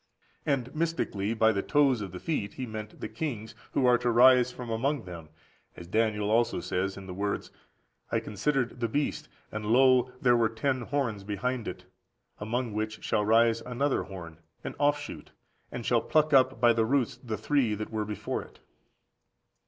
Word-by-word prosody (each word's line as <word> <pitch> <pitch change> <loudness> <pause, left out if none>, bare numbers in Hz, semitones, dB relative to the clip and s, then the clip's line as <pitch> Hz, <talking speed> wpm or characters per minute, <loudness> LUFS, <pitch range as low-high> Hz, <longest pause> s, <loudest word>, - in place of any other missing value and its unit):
And 130 -4 0
mystically 155 -10 -1
by 110 0 +4
the 100 -2 -1
toes 140 -4 +3
of 100 -3 -5
the 90 - -7
feet 105 - -3
he 130 - -4
meant 110 -2 -7
the - - -3
kings 115 -9 -5 0.2
who 130 - +2
are 125 -1 +5
to - - -2
arise 125 +1 +6
from 125 -2 -7
among 130 +4 0
them; 85 -4 -9 0.5
as 85 - -9
Daniel 105 +1 0
also 115 +1 +2
says 95 +2 -2
(in 95 - -9
the 95 - -7
words), 100 +2 -3 0.6
"I - - +2
considered 125 +3 -1
the 120 - 0
beast, 150 +3 -2 0.2
and 110 0 -4
lo 125 +2 +4
there 125 -2 +4
were 115 -2 +3
ten 130 +3 -1
horns 120 -6 -2
behind 110 +4 -2
it, - - -7 0.5
among 115 +2 -2
which 110 +1 -3
shall 105 -1 +1
rise 115 +1 +4
another 130 +3 0
(horn), 85 -4 -9 0.2
an - - -5
offshoot, 145 - -1 0.4
and - - -6
shall - - +3
pluck 155 -1 +2
up 130 -2 +4
by 120 0 +5
the 115 0 +2
roots 135 0 +1
the 115 -3 -5
three 120 0 +1
(that 110 +2 -6
were) 110 -1 -1
before 105 -1 -3
it." - - -15
115 Hz, 180 wpm, -29 LUFS, 105-130 Hz, 0.6 s, arise